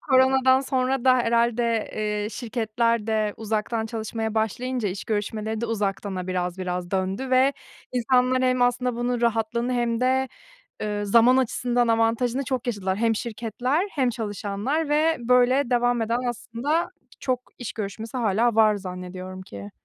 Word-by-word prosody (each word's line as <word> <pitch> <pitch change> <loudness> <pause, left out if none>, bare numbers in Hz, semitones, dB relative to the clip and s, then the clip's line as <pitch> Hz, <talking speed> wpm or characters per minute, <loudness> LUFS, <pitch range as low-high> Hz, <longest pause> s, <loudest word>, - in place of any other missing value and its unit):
koronadan 260 0 +4
sonra 260 -1 0
da 255 -1 +6
herhâlde, 235 -1 +1
eee, 210 -1 -2
şirketler 230 -1 -1
de 215 -2 0
uzaktan 220 +1 -2
çalışmaya 220 0 -4
başlayınca 240 +1 -1
iş 185 +1 -5
görüşmeleri 215 +1 -2
de 235 - -1
uzaktana 200 -3 -2
biraz 180 0 -2
biraz 180 -1 -3
döndü 195 +7 -2
ve 260 +2 +4 0.4
insanlar, 255 +1 +2
hem 255 -1 +2
aslında 245 0 +1
bunun 240 0 -1
rahatlığını 235 +1 0
hem 235 -1 0
de, 260 +1 +2 0.5
eee, 205 -1 -2
zaman 235 +5 +5
açısından 245 -1 +1
avantajını 230 +3 +1
çok 255 -2 -3
yaşadılar. 195 -4 -1
Hem 225 0 +2
şirketler 240 - -2
hem 260 -4 +1
çalışanlar 220 - -2
ve 315 +2 +3
böyle 250 +2 +3
devam 245 -1 +2
eden 230 +2 0
aslında 240 +7 -2 0.3
çok 255 -1 0 0.2
iş 245 - -6
görüşmesi 220 +3 -5
hâlâ 225 +1 +2
var 215 -1 +5
zannediyorum 185 -1 -7
ki. 100 - -9
230 Hz, 140 wpm, -24 LUFS, 210-250 Hz, 0.5 s, da